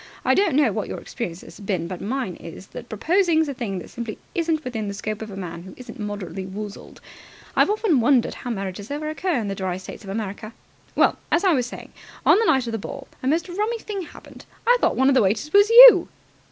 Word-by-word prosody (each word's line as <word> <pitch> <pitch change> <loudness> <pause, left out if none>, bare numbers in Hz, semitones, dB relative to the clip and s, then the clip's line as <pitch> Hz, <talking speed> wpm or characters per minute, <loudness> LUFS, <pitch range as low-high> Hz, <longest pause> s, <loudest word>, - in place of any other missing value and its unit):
I - - +4
don't 385 -7 +2
know 285 -6 +4
what 205 0 -3
your - - -5
experience 180 -8 -6
has - - -13
been, 195 -5 -2
but 185 0 -7
mine 235 -5 -3
is 170 +3 -10
that 240 - -10
proposing's 320 - +2
a 280 - -3
thing 220 -7 -4
that 180 - -8
simply 235 -3 -6 0.2
isn't 325 -2 -1
within 225 -5 -4
the 200 - -4
scope 215 +1 -4
of 220 - -6
a 195 - -8
man 170 -3 -6
who 185 +1 -12
isn't 245 -3 -11
moderately 205 -2 -5
woozled. 200 +2 -8 0.5
I've - - +4
often 420 - +2
wondered 245 +1 +3
how 245 - -7
marriages 195 -2 -5
ever 305 +2 -3
occur 330 +3 -1
in 215 - -3
the 195 - -2
dry 185 -2 -3
States 185 - -10
of 195 - -10
America. 215 +1 -5 0.4
Well, - - +3
as 340 - +2
I 375 -3 +4
was 250 -4 0
saying, - - -10 0.3
on - - +6
the 455 - +2
night 265 - +3
of 230 - -4
the 225 - -3
ball 270 +6 -8
a 255 - -3
most 320 +6 +1
rummy 420 +6 -2
thing 420 -3 -5
happened. 340 - -13 0.2
I 485 - +6
thought - - +2
one 265 - +3
of 275 - +5
the 260 - +4
waiters 210 +9 0
was 405 +1 +6
you!" - - +10
235 Hz, 235 wpm, -23 LUFS, 200-315 Hz, 0.5 s, you